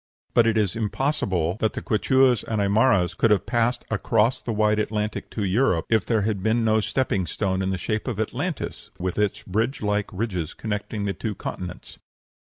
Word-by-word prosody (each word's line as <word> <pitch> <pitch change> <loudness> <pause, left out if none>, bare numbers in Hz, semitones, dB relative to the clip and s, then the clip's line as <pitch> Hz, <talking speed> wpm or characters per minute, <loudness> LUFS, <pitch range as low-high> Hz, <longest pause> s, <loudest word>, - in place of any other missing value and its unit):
] - - -49
But 115 -1 +5
it 115 -1 +2
is 105 -4 +1
impossible 105 - 0
that 110 - +1
the - - -4
Quichuas 125 +2 +3
and 110 -2 -2
Aimaras 100 -3 +3
could 115 - +2
have 105 -2 +3
passed 120 +1 0
across 110 +3 +2
the 120 - -3
wide 105 0 +2
Atlantic 105 0 -2
to 105 - -3
Europe 95 -3 +2
if 110 -3 +2
there 110 -3 +2
had 105 -2 -1
been 115 +3 +1
no 110 0 +3
stepping 105 -5 0
stone 95 +3 -1
in 95 - 0
the 95 - -1
shape 110 +6 -2
of 115 -5 -3
Atlantis 145 +9 -3
with 90 +2 -2
its 105 -2 0
bridge 110 +7 -1
like 105 0 0
ridges 90 -5 -3
connecting 105 -1 -3
the 100 - -1
two 105 +3 -4
continents. 90 -2 -7
105 Hz, 195 wpm, -24 LUFS, 100-115 Hz, -, But